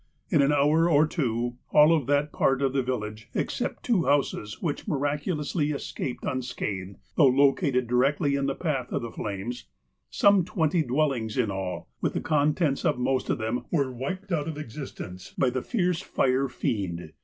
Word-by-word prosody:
In 155 -6 +5
an 140 +1 +3
hour 150 +4 +3
or 150 -1 +5
two 120 -6 -2
all 150 +2 +7
of 145 -6 -1
that 145 +1 +2
part 135 0 +1
of 135 -1 +1
the 135 - +2
village 110 -4 -4
(except - - -2
two 205 -9 +2
houses, 135 -7 0
which 160 +3 -3
miraculously 150 0 -1
escaped 140 -3 -4
unscathed, 105 -7 -3 0.2
though 150 - +7
located 135 0 +3
directly 140 +5 +2
in 140 0 0
the 135 - -1
path 140 -8 -2
of - - -1
the 115 - -5
flames), 105 +4 -5 0.4
some 200 - +4
twenty 165 -1 +1
dwellings 130 -5 0
in 115 -5 +1
all, 95 -1 -4
with - - -1
the - - +1
contents 150 -1 +1
of - - +2
most 130 +1 0
of - - +1
them, 120 +2 -2
were 140 -6 +1
wiped 185 +11 -5
out 155 -3 0
of 160 -2 -4
existence 115 -9 -8
by 130 -2 +2
the 130 0 -2
fierce 180 - 0
fire 135 -5 +1
fiend. 95 -8 -3
140 Hz, 175 wpm, -27 LUFS, 120-150 Hz, 0.4 s, all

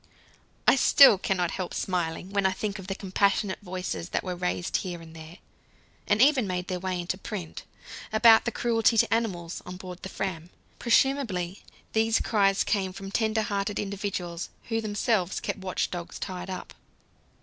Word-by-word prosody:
I - - +7
still 270 -8 +7
cannot 180 -3 0
help 185 -2 -4
smiling 180 0 -2
when 200 -1 +2
I 190 - 0
think 205 +1 -4
of 190 - -9
the 195 - -3
compassionate 195 0 0
voices 185 -2 -4
that - - -1
were 180 -1 -3
raised 180 0 -1
here 175 -3 -5
and 165 -1 -13
there 160 +2 -11 0.7
and 205 0 +2
even 270 -6 +4
made 180 0 -3
their 180 -1 -2
way 185 0 -2
into 175 +2 -3
print 190 -6 -6 0.5
about 220 0 +6
the 235 - 0
"cruelty 230 0 +2
to 215 - +4
animals" 180 -7 -2
on 180 0 -8
board 180 -1 -9
the 190 - -6
Fram. 175 -4 -4 0.3
Presumably 230 -8 +1 0.3
these 225 0 +3
cries 195 -3 +2
came 190 -3 -1
from 195 0 -8
tender 220 0 +1
hearted 200 0 -2
individuals 195 -4 -4 0.2
who 225 -1 0
themselves 205 -3 0
kept - - -4
watch 185 -1 -2
dogs 175 -1 -6
tied 185 0 -5
up. 185 - -6
190 Hz, 170 wpm, -27 LUFS, 180-215 Hz, 0.7 s, I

